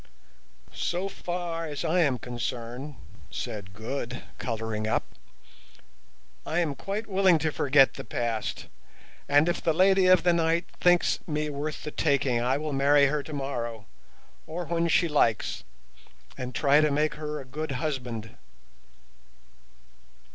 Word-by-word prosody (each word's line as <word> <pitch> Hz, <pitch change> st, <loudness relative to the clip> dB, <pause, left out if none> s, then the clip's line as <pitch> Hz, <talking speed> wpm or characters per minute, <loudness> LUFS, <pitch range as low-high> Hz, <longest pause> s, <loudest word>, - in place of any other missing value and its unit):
"So 180 Hz, +3 st, -2 dB
far 175 Hz, -3 st, -4 dB
as 150 Hz, +2 st, -4 dB
I 165 Hz, +3 st, +2 dB
am 140 Hz, -7 st, +3 dB
concerned," 120 Hz, +3 st, -5 dB, 0.3 s
said 105 Hz, -5 st, -5 dB
Good, 120 Hz, +2 st, -5 dB, 0.2 s
colouring 110 Hz, -2 st, -3 dB
up, -, -, +1 dB, 1.4 s
"I 160 Hz, -, -3 dB
am 165 Hz, -5 st, +1 dB
quite 200 Hz, +9 st, -4 dB
willing 190 Hz, -4 st, +4 dB
to 155 Hz, 0 st, -1 dB
forget 135 Hz, -1 st, +4 dB
the -, -, -7 dB
past; 115 Hz, -2 st, -3 dB, 0.6 s
and 145 Hz, +3 st, +5 dB
if 175 Hz, -, 0 dB
the 160 Hz, -, +2 dB
Lady 190 Hz, +2 st, +4 dB
of 185 Hz, -1 st, +6 dB
the 175 Hz, -1 st, +4 dB
Night 165 Hz, +1 st, +1 dB
thinks 175 Hz, -1 st, +4 dB
me 150 Hz, -1 st, -1 dB
worth 145 Hz, +2 st, -4 dB
the 150 Hz, -, -5 dB
taking 135 Hz, -6 st, +1 dB
I 125 Hz, +3 st, +1 dB
will 150 Hz, 0 st, -3 dB
marry 140 Hz, +1 st, +5 dB
her 150 Hz, +1 st, 0 dB
tomorrow, 130 Hz, -7 st, -4 dB, 0.6 s
or 170 Hz, +2 st, -4 dB
when 170 Hz, +1 st, 0 dB
she 170 Hz, +1 st, +3 dB
likes, 115 Hz, -8 st, +1 dB, 0.7 s
and 125 Hz, -1 st, -6 dB
try 145 Hz, +1 st, +5 dB
to 155 Hz, -, +3 dB
make 150 Hz, +2 st, +1 dB
her 150 Hz, 0 st, -5 dB
a 135 Hz, -, -9 dB
good 150 Hz, +3 st, -4 dB
husband." 125 Hz, -6 st, -4 dB
150 Hz, 140 wpm, -27 LUFS, 125-165 Hz, 1.4 s, of